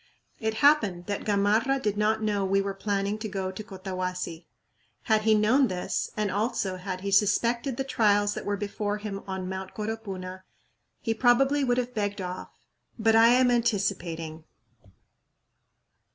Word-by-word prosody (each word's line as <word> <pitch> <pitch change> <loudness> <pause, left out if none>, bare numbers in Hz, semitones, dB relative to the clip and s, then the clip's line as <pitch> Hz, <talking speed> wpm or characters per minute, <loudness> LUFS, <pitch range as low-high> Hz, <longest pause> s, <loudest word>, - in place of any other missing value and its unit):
It 220 -1 -1
happened 205 -13 +4
that 205 -1 -4
Gamarra 215 +6 +2
did 210 -5 -1
not 215 +1 +1
know 205 -2 0
we 195 +1 +2
were 195 0 -2
planning 200 +1 -2
to 215 0 -4
go 190 -1 -3
to 190 +3 -7
Cotahuasi. 185 -3 -5 0.6
Had 215 -1 +2
he 220 0 +4
known 240 +6 +4
this, 180 -3 -2
and 210 -2 0
also 200 -2 -1
had 185 0 -5
he 200 +1 -3
suspected 235 +5 +2
the 270 - 0
trials 205 -6 +2
that - - -5
were 205 0 -1
before 205 0 -3
him 205 -2 -5
on 190 -1 -4
Mt. 190 0 -6
Coropuna, 195 -4 -5 0.6
he 225 - 0
probably 270 +5 +3
would 245 -2 +1
have 250 0 -2
begged 205 -2 -2
off 180 -1 -5 0.5
but 225 -1 +3
I 225 +1 +7
am 250 +1 +5
anticipating. 185 -9 -1
205 Hz, 155 wpm, -27 LUFS, 190-225 Hz, 0.6 s, I